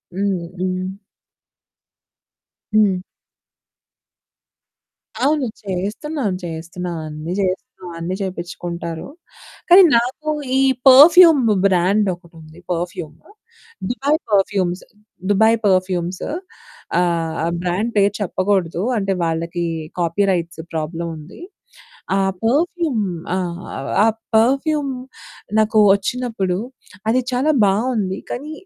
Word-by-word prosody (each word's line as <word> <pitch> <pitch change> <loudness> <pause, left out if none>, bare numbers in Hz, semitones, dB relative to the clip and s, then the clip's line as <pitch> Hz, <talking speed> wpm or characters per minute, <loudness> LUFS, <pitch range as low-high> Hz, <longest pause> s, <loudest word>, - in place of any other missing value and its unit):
హ్మ్. 190 -3 -1
హ్మ్. 185 0 -2 1.9
హ్మ్. 205 -3 +4 2.3
అవును. 290 0 +2 0.2
చేస్తున్నాను, 205 - -3
చేస్తున్నాను, 170 +1 -5
అన్నీ 155 +3 -5
చేస్తున్నాను, 190 +1 -4
అన్నీ 175 +3 -3
చేపించుకుంటారు. 170 -3 -5 0.6
కానీ 370 +2 +9
నాకు 255 +6 -2 0.3
ఈ - - +4 0.3
పెర్ఫ్యూమ్ 310 +2 +8 0.2
బ్రాండ్ 195 +3 +2
ఒకటుంది. 165 -2 -16
పెర్ఫ్యూము 175 -3 -4 0.7
దుబాయ్ 275 +5 +1
పెర్ఫ్యూమ్స్, 195 -2 +1 0.5
దుబాయ్ 220 +3 +4
పెర్ఫ్యూమ్సు 185 -1 0 0.7
ఆహ్, 170 -2 0
ఆ - - +1 0.2
బ్రాండ్ 185 +6 -1
పేరు 200 0 +4
చెప్పకూడదు. 185 -3 0 0.2
అంటే 195 -2 0
వాళ్ళకి 165 +1 -2 0.3
కాపీరైట్స్ 170 -1 0
ప్రాబ్లమ్ 165 +2 -3
ఉంది. 155 +5 -12 0.8
ఆ - - +2 0.3
పెర్ఫ్యూమ్ 300 - +1 0.3
ఆ! - - 0 0.7
ఆ - - +5 0.3
పెర్ఫ్యూమ్ 275 +5 +2 0.7
నాకు 215 0 +3 0.2
వచ్చినప్పుడు 200 -3 -2 0.5
అది 250 +3 +3
చాలా 260 +5 +2 0.2
బావుంది. 200 -1 0
కానీ 290 +5 -5
190 Hz, 90 wpm, -20 LUFS, 175-235 Hz, 2.3 s, కానీ